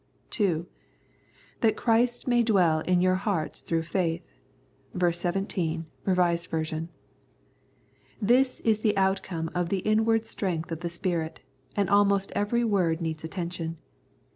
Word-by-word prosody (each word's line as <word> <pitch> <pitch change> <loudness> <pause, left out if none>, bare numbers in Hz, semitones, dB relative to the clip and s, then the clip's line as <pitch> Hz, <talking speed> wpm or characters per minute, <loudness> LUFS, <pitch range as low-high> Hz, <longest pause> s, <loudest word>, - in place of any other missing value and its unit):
(2) 175 -7 +1 0.5
" - - -32
That 225 -3 +3
Christ 240 +2 +2
may 240 -1 +4
dwell 185 -9 +3
in 180 +2 +2
your 185 0 +4
hearts 185 -4 -2
through 165 -1 -1
faith" 170 0 -1 0.7
(ver. 175 -1 +3
17, 175 -2 -1 0.2
R.V.). 180 -2 +3 1.8
This 250 +4 +3
is 220 -2 +2
the 215 -2 +1
outcome 190 -4 0
of 175 -1 -1
the 195 0 0
inward 220 +1 +3
strength 170 -7 -3
of 165 - -3
the 175 0 -3
Spirit, 170 -2 -2 0.3
and 200 -2 +1
almost 200 0 +3
every 235 +4 0
word 185 -7 +1
needs 160 -2 -3
attention. 170 -1 -4
185 Hz, 130 wpm, -27 LUFS, 170-210 Hz, 1.8 s, may